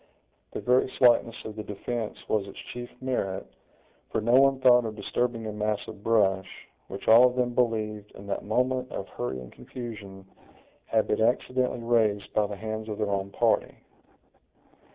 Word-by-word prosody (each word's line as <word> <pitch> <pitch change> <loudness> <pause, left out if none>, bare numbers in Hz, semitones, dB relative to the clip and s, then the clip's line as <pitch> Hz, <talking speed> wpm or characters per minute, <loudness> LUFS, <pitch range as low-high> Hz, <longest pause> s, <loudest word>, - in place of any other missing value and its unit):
The - - -4
very 125 +1 +2
slightness 120 -2 +4
of 110 - -6
the 110 - -4
defense 105 +2 -4
was 105 -2 0
its 100 - -11 0.2
chief 120 0 -6
merit, 100 -7 -2 0.6
for - - -1
no 110 +2 0
one 135 +1 +5
thought 125 -2 +6
of 110 -1 -4
disturbing 120 +1 -2
a 110 - -3
mass 105 0 -1
of 105 -2 -10
brush, 95 -4 +1 0.2
which - - -8
all 120 +3 +8
of 125 - -3
them 125 -1 0
believed, 110 -4 -1
in 100 - -11
that 100 - -3
moment 125 +4 0
of - - -5
hurry 65 +1 -4
and 65 -1 -10
confusion, 100 -6 -9 0.6
had 110 -1 +2
been 105 - 0
accidentally 125 +1 +1
raised 110 -4 +1
by 105 -1 +2
the 100 - -6
hands 110 +1 -5
of 105 - -4
their 105 -2 -1
own 100 0 -1
party. - - +1
110 Hz, 175 wpm, -27 LUFS, 105-120 Hz, 0.6 s, all